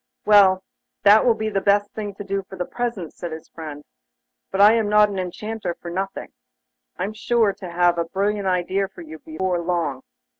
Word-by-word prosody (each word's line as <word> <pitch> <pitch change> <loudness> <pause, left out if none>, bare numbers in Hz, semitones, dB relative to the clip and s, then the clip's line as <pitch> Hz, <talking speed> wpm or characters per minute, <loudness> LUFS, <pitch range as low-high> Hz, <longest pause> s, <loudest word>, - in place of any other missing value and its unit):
'Well, 195 -3 +6 0.4
that 210 +4 +6
will 235 - +5
be 220 0 -2
the 195 -1 0
best 205 +1 +2
thing 205 -2 -6
to 205 - -7
do 195 0 -2
for 190 - -8
the 180 -1 -3
present,' 230 -9 -4
said 175 - -7
his 160 0 -8
friend. 150 -3 -8 0.7
'But 195 - -3
I 205 +2 +8
am 225 -2 +1
not 210 0 +5
an 195 -2 -4
Enchanter 185 0 -4
for 170 - -9
nothing. 195 +2 -4 0.7
I'm 205 - -3
sure 225 -1 +1
to 185 - -9
have 175 0 +2
a 170 - 0
brilliant 200 +3 -1
idea 185 +2 0
for 190 -2 -13
you 160 0 -10
before 175 +4 -2
long. 170 -6 -2
195 Hz, 195 wpm, -22 LUFS, 175-210 Hz, 0.7 s, I